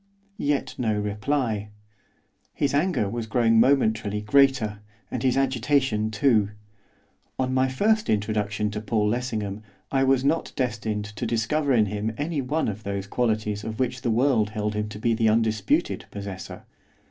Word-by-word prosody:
Yet 140 Hz, -4 st, 0 dB
no 110 Hz, -4 st, +1 dB
reply. 105 Hz, +1 st, -1 dB, 0.9 s
His 145 Hz, -, 0 dB
anger 150 Hz, -, +1 dB
was 115 Hz, +2 st, -4 dB
growing 115 Hz, -1 st, +3 dB
momentarily 110 Hz, -5 st, +2 dB
greater, 120 Hz, -3 st, +3 dB, 0.3 s
and -, -, -3 dB
his 130 Hz, -1 st, +2 dB
agitation 130 Hz, -4 st, +1 dB
too. 110 Hz, -2 st, +2 dB, 0.9 s
On 130 Hz, 0 st, 0 dB
my 130 Hz, 0 st, +3 dB
first 210 Hz, +12 st, +1 dB
introduction 105 Hz, 0 st, 0 dB
to 105 Hz, 0 st, -4 dB
Paul 105 Hz, -1 st, 0 dB
Lessingham 110 Hz, -3 st, -2 dB, 0.3 s
I 135 Hz, -1 st, +2 dB
was 135 Hz, 0 st, +3 dB
not 160 Hz, +4 st, 0 dB
destined 110 Hz, -4 st, -2 dB
to 105 Hz, +3 st, -5 dB
discover 135 Hz, +6 st, 0 dB
in 110 Hz, -3 st, +4 dB
him 105 Hz, +2 st, -3 dB
any 150 Hz, 0 st, -1 dB
one 150 Hz, +5 st, -1 dB
of 105 Hz, 0 st, -4 dB
those 100 Hz, -1 st, -3 dB
qualities 105 Hz, -2 st, -1 dB
of 110 Hz, +1 st, -5 dB
which 125 Hz, -1 st, -1 dB
the 120 Hz, -, -1 dB
world 115 Hz, -2 st, +2 dB
held 105 Hz, -1 st, -2 dB
him 105 Hz, 0 st, -2 dB
to 105 Hz, -, -8 dB
be 115 Hz, +2 st, +1 dB
the 110 Hz, -1 st, +2 dB
undisputed 110 Hz, -2 st, +1 dB
possessor. 100 Hz, -2 st, -7 dB
110 Hz, 155 wpm, -25 LUFS, 105-130 Hz, 0.9 s, in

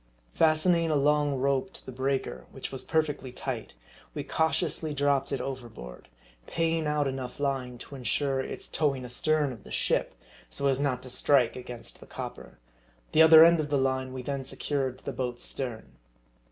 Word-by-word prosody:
Fastening 165 Hz, +1 st, +3 dB
a 155 Hz, -, +2 dB
long 145 Hz, 0 st, +3 dB
rope 140 Hz, +7 st, 0 dB
to -, -, -12 dB
the -, -, -7 dB
breaker, 130 Hz, +1 st, -2 dB
which 130 Hz, -, -6 dB
was 135 Hz, -, -3 dB
perfectly 150 Hz, -5 st, -1 dB
tight, 125 Hz, -, -5 dB, 0.4 s
we -, -, -3 dB
cautiously 160 Hz, -1 st, 0 dB
dropped 140 Hz, -1 st, +1 dB
it 140 Hz, -, -1 dB
overboard; 120 Hz, -, -7 dB, 0.4 s
paying 165 Hz, -1 st, 0 dB
out 150 Hz, -1 st, +1 dB
enough 130 Hz, -1 st, -5 dB
line, 135 Hz, -3 st, -1 dB
to 130 Hz, -, -11 dB
insure 135 Hz, +1 st, 0 dB
its 130 Hz, -, -5 dB
towing 140 Hz, -5 st, 0 dB
astern 150 Hz, +4 st, +1 dB
of 115 Hz, -, -13 dB
the -, -, -13 dB
ship, -, -, 0 dB, 0.3 s
so 140 Hz, -, -3 dB
as 135 Hz, -1 st, +3 dB
not 140 Hz, -3 st, 0 dB
to 130 Hz, -, -8 dB
strike 125 Hz, -2 st, +3 dB
against 125 Hz, -2 st, -8 dB
the -, -, -14 dB
copper. -, -, -8 dB, 0.5 s
The 160 Hz, -, +5 dB
other 160 Hz, 0 st, +10 dB
end 170 Hz, 0 st, +5 dB
of 150 Hz, -1 st, -2 dB
the 145 Hz, -, +2 dB
line 130 Hz, -1 st, 0 dB
we 130 Hz, -1 st, -6 dB
then 140 Hz, 0 st, -3 dB
secured 135 Hz, -1 st, -2 dB
to -, -, -19 dB
the -, -, -3 dB
boat's 125 Hz, -2 st, -3 dB
stern. 120 Hz, -5 st, -4 dB
135 Hz, 180 wpm, -28 LUFS, 130-150 Hz, 0.5 s, other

